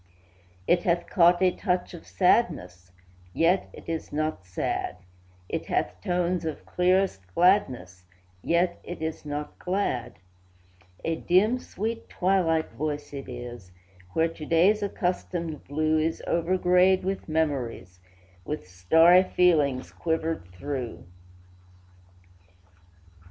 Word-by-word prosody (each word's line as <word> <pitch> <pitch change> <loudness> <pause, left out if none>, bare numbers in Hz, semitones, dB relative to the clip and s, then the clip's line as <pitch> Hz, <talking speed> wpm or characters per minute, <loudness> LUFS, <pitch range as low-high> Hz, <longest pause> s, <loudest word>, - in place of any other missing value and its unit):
It 175 - +3
hath 175 0 +1
caught 175 0 +4
a 185 - +5
touch 180 -2 -2
of 170 - -11
sadness, 95 - +1 0.4
Yet 175 - +2
it - - -13
is 165 -1 -4
not 155 - -2
sad; 90 0 -3 0.5
It - - -4
hath 90 - -1
tones 175 - 0
of 160 -2 -5
clearest 185 - +1
gladness, 125 - +2 0.4
Yet 175 - +1
it 175 - -7
is 160 -1 -4
not 145 0 -5
glad; 155 - -2 0.9
A 165 0 0
dim, 210 +10 +3
sweet, 230 0 -5
twilight 180 -4 +1
voice 150 -1 -4
it 135 -1 -7
is 120 -6 -8 0.4
Where 160 0 +3
to 165 -1 -10
day's 190 +6 +4
accustomed 175 -5 -3
blue 155 +2 +1
Is 160 +1 -1
over 170 +2 +1
grayed 180 +1 +4
with 190 -2 -3
memories, 130 - -2 0.4
With 150 -4 -5
starry 160 - +5
feelings 155 -8 +2
quivered 160 - -2
through. 130 +4 -5
165 Hz, 115 wpm, -26 LUFS, 140-180 Hz, 0.9 s, a